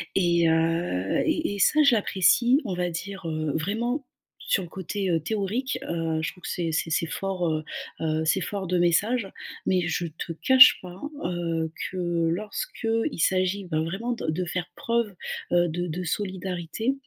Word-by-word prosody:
Et 170 -3 +3
heu, 160 - +1
et 315 -9 0
et - - -6
ça 305 +10 +5
je 280 -4 +6
l'apprécie, 235 - +4
on 195 - -2
va 180 0 -1
dire, 190 +2 -6
heu, 155 -1 -1
vraiment 235 - -1 0.4
sur 190 - +1
le 175 - -9
côté, 190 +2 -3
heu, 165 -2 +2
théorique, 220 - -2
heu, 165 -1 -1
je - - -2
trouve 180 - -20
que - - -4
c'est 170 -2 -1
c'est 165 - 0
c'est 165 +1 +1
fort, 185 +3 -2
heu 155 -1 -1 0.4
heu, 160 0 0
c'est 190 +4 +2
fort 195 0 -3
de 180 +1 +1
message, 200 +7 +2 0.4
mais 185 -1 +2
je 160 +2 -1
te 165 +1 -6
cache 255 +9 +8
pas, 180 0 -10 0.2
heu, 165 -2 -1 0.2
que 175 -2 0
lorsqu'il 220 - -2
s'agit 185 +2 +1
ben 160 -3 -1
vraiment 195 +9 -3
de 215 -9 -4
de 175 +4 -1
faire 175 0 -3
preuve, 230 -4 -1 0.4
heu, 175 -1 +4
de 175 +2 -2
de 175 +2 -4
solidarité. 185 +4 -2
180 Hz, 175 wpm, -26 LUFS, 165-205 Hz, 0.4 s, cache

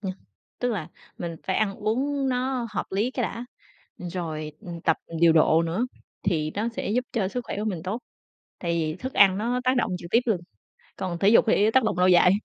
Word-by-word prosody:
ừm, 190 -2 -3 0.5
tức 245 - 0
là 180 -8 -4 0.3
mình 170 -1 -4
phải 190 - +1
ăn 205 -2 +1
uống 270 +6 0
nó 255 -1 -1
hợp - - -1
lý 210 +6 0
cái 255 - -2
đã, 235 +1 -3 0.5
rồi 165 -4 -4 0.3
tập 160 - +3 0.2
điều 170 -1 +6
độ 160 0 +5
nữa, 175 +9 0 0.4
thì 155 -6 0
nó 215 +3 0
sẽ 230 - -4
giúp 250 +4 +1
cho 210 -5 +1
sức 245 +6 -3
khỏe - - -4
của 210 - -2
mình 180 -7 -3
tốt, 200 +6 -3 0.6
tại 170 -1 -2
vì 160 -2 0
thức 260 +6 -5
ăn 195 -1 +6
nó 245 +4 0
tác 255 0 +3
động 225 -4 +1
trực 170 0 -10
tiếp 235 - +5
luôn, 205 -7 +1 0.6
còn 180 -2 -3
thể 200 +2 +5
dục 230 - +6
thì 215 0 +4
tác 260 +1 +4
động 220 - 0
lâu 180 - +5
dài. 180 0 +6
200 Hz, 215 wpm, -26 LUFS, 175-235 Hz, 0.6 s, điều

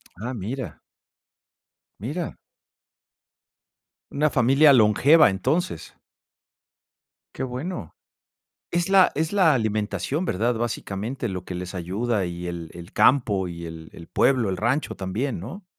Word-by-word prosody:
Ah, 125 +5 -5
mira. 120 +4 -5 1.2
Mira. 150 - -4 1.7
Una 150 +1 +1
familia 135 +4 +5
longeva, 130 +7 +6
entonces. 95 - -2 1.4
Qué 130 - -3
bueno. 130 - -5 0.8
Es 175 +1 0
la 195 -1 +5
es 160 +4 -1
la 180 -7 +4
alimentación, 110 - -1
¿verdad?, 120 - 0
básicamente, 115 +1 -3
lo 90 -1 -5
que 90 - -7
les 90 +1 -6
ayuda 95 +3 -1
y 85 0 -6
el 85 -2 -6
el 85 0 -11
campo 105 -9 +3
y 85 0 -7
el 80 -1 -9
el 85 - -12
pueblo, 125 -6 +2
el 95 - -2
rancho 130 +7 0
también, 105 +7 -3
¿no? 180 - -9
115 Hz, 120 wpm, -24 LUFS, 95-140 Hz, 1.7 s, longeva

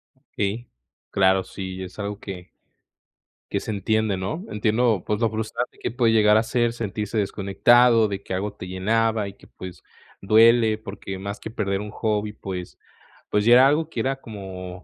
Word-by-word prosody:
Okey, 115 -3 -4 0.4
claro, 95 -1 +3
sí, 95 0 -7
es 90 - -10
algo 100 0 -4
que 90 -3 -8 1.0
que - - 0
se - - -8
entiende, 105 0 0
¿no? 130 - -4
Entiendo, 110 -1 +1
pues, 105 0 -1
lo 115 - +3
frustrante 110 +3 -4
que - - -3
puede 120 -2 +2
llegar 105 -1 +5
a - - +4
ser, 120 -1 0
sentirse 105 -1 -4
desconectado, 110 +4 +4
de 100 -1 -5
que - - -6
algo 100 +2 -2
te 90 - -9
llenaba 110 +3 0
y 100 - -8
que, - - -20
pues, 90 -1 -10 0.4
duele, 110 +1 +5
porque 100 -3 -7
más 100 +1 -5
que 110 - -7
perder 100 -3 -1
un 105 -1 -7
hobby, 105 -1 -1
pues 90 -3 -7 0.5
pues, 105 0 +1
ya 120 - +7
era 130 +2 +8
algo 155 +2 +1
que 125 - -5
era 135 +4 0
como 95 -4 -8
105 Hz, 180 wpm, -23 LUFS, 95-115 Hz, 1.0 s, era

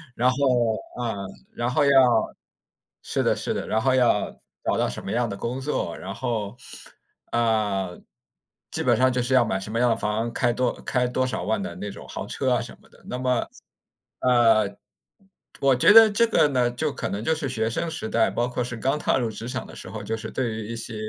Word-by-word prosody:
然 125 +2 +3
后 130 - -5 0.6
啊， 120 -3 -2 0.4
然 120 +1 -2
后 145 +4 +2
要 140 - +4 1.1
是 - - -1
的， - - +2
是 - - -2
的， - - -4
然 110 +1 +1
后 130 +1 +2
要 120 -5 +2 0.3
找 - - 0
到 - - +1
什 - - -5
么 95 - -5
样 120 0 +1
的 100 - -4
工 120 +6 -4
作， 130 - -2
然 95 +2 -7
后 115 -4 -3 0.8
呃， 105 -6 0 0.7
基 - - -2
本 - - +4
上 130 0 +4
就 125 0 0
是 130 +2 -1
要 120 - +5
买 95 -3 -1
什 105 +2 -7
么 115 - -1
样 125 -1 +3
的 115 - +3
房， 110 +2 -1
开 120 -2 +2
多 125 0 +1
开 125 -1 0
多 130 +1 0
少 - - -3
万 200 - 0
的 205 - -5
那 105 - -5
种 - - -11
豪 - - -6
车 - - -1
啊 - - 0
什 - - -8
么 - - -23
的。 - - -22
那 125 - -4
么， 125 -1 0 0.7
呃， 115 -5 +4 0.8
我 135 -2 +4
觉 125 - +6
得 225 -1 +9
这 230 +3 +3
个 160 -9 +4
呢， 125 -3 +1
就 145 +4 -1
可 - - -4
能， 100 +2 -4
就 160 +5 +1
是 150 -3 -2
学 110 -2 0
生 165 +8 -2
时 155 -9 -4
代， 115 -1 +2
包 120 +1 0
括 125 0 -2
是 120 0 -5
刚 135 +6 0
踏 - - +1
入 120 -3 -1
职 115 +2 -7
场 125 - -3
的 - - -12
时 - - -8
候， 110 - -6
就 110 +2 -3
是 110 0 -7
对 125 -4 -1
于 110 -1 -6
一 115 - -5
些， 115 0 -6
120 Hz, 245 characters per minute, -24 LUFS, 110-130 Hz, 1.1 s, 得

